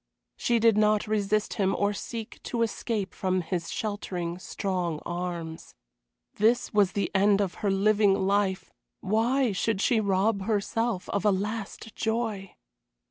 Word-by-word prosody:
She 240 - +1
did 225 -2 +4
not 210 0 +3
resist 215 0 0
him 195 0 +2
or 205 0 +1
seek 225 +2 -7
to 235 -2 -1
escape 220 -2 -2
from 185 -1 0
his 170 0 -3
sheltering, 180 -5 -3
strong 180 -4 -2
arms. 175 -2 -5 0.6
This 230 +4 +2
was 205 -3 +3
the 200 - -1
end 200 +1 +4
of 195 -3 0
her 205 - +1
living 205 0 +3
life, 195 -1 0 0.3
why 230 +5 +2
should 200 +2 0
she 230 +2 +3
rob 200 0 +1
herself 220 -1 -1
of 200 - -1
a 210 - +4
last 210 +2 -4
joy? 220 -4 -2
205 Hz, 140 wpm, -27 LUFS, 190-220 Hz, 0.6 s, did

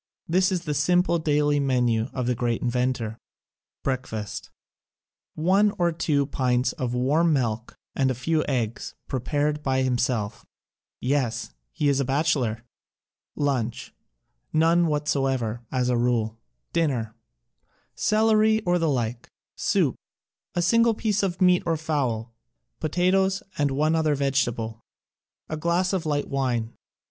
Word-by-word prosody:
This 185 +3 +2
is 180 -2 -1
the 150 -3 -2
simple 170 +4 +2
daily 150 -1 +2
menu 125 -4 +1
of 130 -2 -3
the 125 - +1
great 120 -1 -1
inventor: 125 -2 -1 0.6
Breakfast: 125 -6 -4 0.9
One 195 +6 +2
to 175 -1 +2
two 150 -3 +1
pints 125 -2 +1
of 125 -1 -3
warm 155 +7 +2
milk 115 -4 -1 0.2
and 135 -1 +2
a 130 - 0
few 155 +5 0
eggs, 120 -5 -2
prepared 145 +3 -1
by 130 -2 +1
himself 125 -4 -1 0.3
— - - -68 0.2
yes, 130 -3 -1 0.2
he 145 - -1
is 140 -1 +3
a - - +2
bachelor! 135 -5 0 0.7
Lunch: 130 -6 -2 0.6
None 165 +2 +3
whatsoever, 135 -6 0
as 125 -1 0
a 125 -1 +2
rule. 115 -2 0 0.3
Dinner: 130 -10 0 0.8
Celeiy 220 0 +3
or 175 0 +2
the 165 -1 +1
like, 120 -3 -2 0.3
soup, - - +1 0.6
a 175 - +1
single 230 +5 +4
piece 210 -2 0
of 185 -3 -1
meat 180 -1 +5
or 165 -1 0
fowl, 130 -8 -2 0.5
potatoes 185 +4 +1
and 145 -1 +1
one 150 +4 +1
other 155 -2 +2
vegetable; 120 -5 -1 0.7
a 155 - -4
glass 170 +4 +1
of 175 -4 -1
light 145 -1 0
wine. 120 -4 -1
140 Hz, 135 wpm, -25 LUFS, 125-165 Hz, 0.9 s, meat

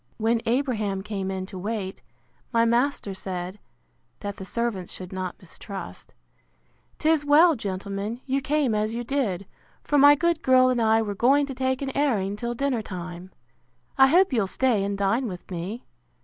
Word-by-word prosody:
When 225 +1 +1
Abraham 225 -6 0
came 195 -2 -4
in 190 -1 -3
to 190 -1 -8
wait, 200 -1 -4 0.5
my 230 -2 +3
master 235 -3 +1
said, 185 +1 -5 0.6
(that 200 -1 -5
the 190 - -7
servants 215 -3 -2
should 185 0 -8
not 185 -1 -4
mistrust,) 195 +2 -9 0.8
'Tis 315 -1 +2
well, 310 +3 +6
gentlemen, 200 +1 -4
you 275 0 0
came 280 -3 +1
as 215 +1 -1
you 240 - -3
did; 225 -8 -1 0.4
for 290 - +2
my 285 +1 +8
good 335 +1 +1
girl 255 0 +5
and 250 -2 +1
I 225 0 +3
were 205 -2 -3
going 270 +8 +3
to 275 - -6
take 260 +1 -1
an 270 -1 -4
airing 215 -9 +1
till 235 +3 -4
dinner 265 -2 0
time. 180 -2 -7 0.7
I 265 - +7
hope 355 +2 +4
you'll 220 -5 +2
stay 235 -1 +1
and 200 0 -2
dine 200 +6 +1
with 180 -1 -8
me. 185 +7 -5
225 Hz, 170 wpm, -25 LUFS, 195-265 Hz, 0.8 s, my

